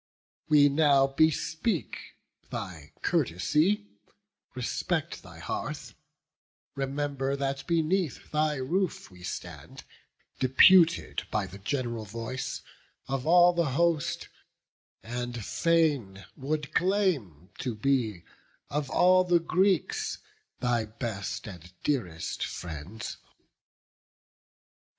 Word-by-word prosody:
We 145 -2 +7
now 140 -2 +4
bespeak 160 - 0 0.5
thy 80 -5 -6
courtesy; 150 - +1 0.7
respect - - -2
Thy - - -13
hearth; - - -5 0.8
remember 140 0 -2
that 135 -1 -3
beneath 170 0 0
thy 155 0 +1
roof 165 - -2
We 90 -1 -15
stand, 90 - -7 0.6
deputed 165 +6 +5
by 105 -2 0
the 95 +1 -10
gen'ral 120 0 -2
voice 115 +5 -5 0.4
Of 135 +1 -2
all 175 +1 +7
the 170 -6 0
host; 170 -4 +1 0.8
and 120 -1 -4
fain 145 - +1
would 145 +2 -3
claim 165 - 0
to 125 -4 -3
be, 110 -6 0 0.5
Of 145 -1 -1
all 185 +4 +5
the 175 -1 +3
Greeks, 180 0 +1 0.4
thy 120 -2 +1
best 110 -2 -5
and 90 -4 -10
dearest 95 - -2
friends." 85 +5 -6
135 Hz, 95 wpm, -28 LUFS, 110-160 Hz, 0.8 s, We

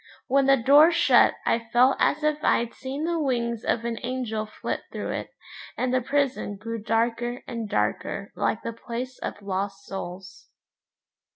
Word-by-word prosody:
When 275 0 +3
the 275 0 +6
door 285 +6 +7
shut 335 - +5
I 230 - +2
felt 250 +3 +5
as 300 +1 +2
if 305 0 0
I'd 235 0 +2
seen 270 +3 -5
the 335 0 0
wings 235 -5 -1
of 230 0 0
an 230 -1 -2
angel 235 -4 -3
flit 215 - -4
through - - -4
it, - - -4 0.5
and 255 0 0
the 255 - +3
prison 275 -5 0
grew 230 +2 -5
darker 230 +2 -1
and 230 -4 -4
darker - - -1
like - - -1
the 230 - -4
place 245 +2 -6
of 205 - -6
lost 195 +1 -3
souls. 185 -1 -8
240 Hz, 165 wpm, -26 LUFS, 220-270 Hz, 0.5 s, door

